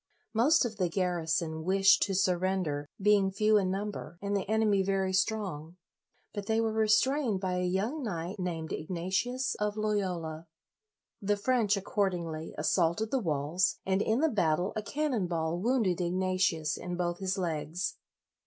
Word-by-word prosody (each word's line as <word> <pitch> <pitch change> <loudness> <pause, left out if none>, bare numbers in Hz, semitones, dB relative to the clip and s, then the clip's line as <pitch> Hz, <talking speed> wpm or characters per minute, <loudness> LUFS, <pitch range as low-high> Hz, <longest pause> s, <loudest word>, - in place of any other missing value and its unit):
Most 255 +6 +4
of 225 -3 -4
the 180 -3 +1
garrison 165 -3 -1
wished 195 +2 +4
to 195 -2 -2
surrender, 180 -5 0
being 200 -1 +4
few 215 +2 +3
in 190 -2 0
number 195 -2 -4
and 200 +1 -2
the 195 0 -2
enemy 215 -2 +3
very 190 0 0
strong; 185 -5 -1 0.6
but 205 -1 -5
they 220 0 +2
were 225 -1 0
restrained 220 +1 +2
by 185 -1 -1
a 180 - 0
young 210 +12 -1
knight 190 -3 -4
named 165 -3 -3
Ignatius 190 +10 -1
of 210 0 -1
Loyola. 180 -7 -2 0.7
The 205 +1 +1
French, 215 -2 +2
accordingly, 175 -5 -2
assaulted 170 +7 +1
the 270 - +2
walls, 165 - 0
and 190 +1 +1
in 220 +5 +1
the 320 - +3
battle 180 - +1
a 215 - -1
cannon 255 -4 -1
ball 165 0 -1
wounded 215 -5 +1
Ignatius 180 -3 0
in 180 0 -5
both 175 -1 -1
his 190 0 -1
legs. 170 0 -2
190 Hz, 155 wpm, -30 LUFS, 175-215 Hz, 0.7 s, Most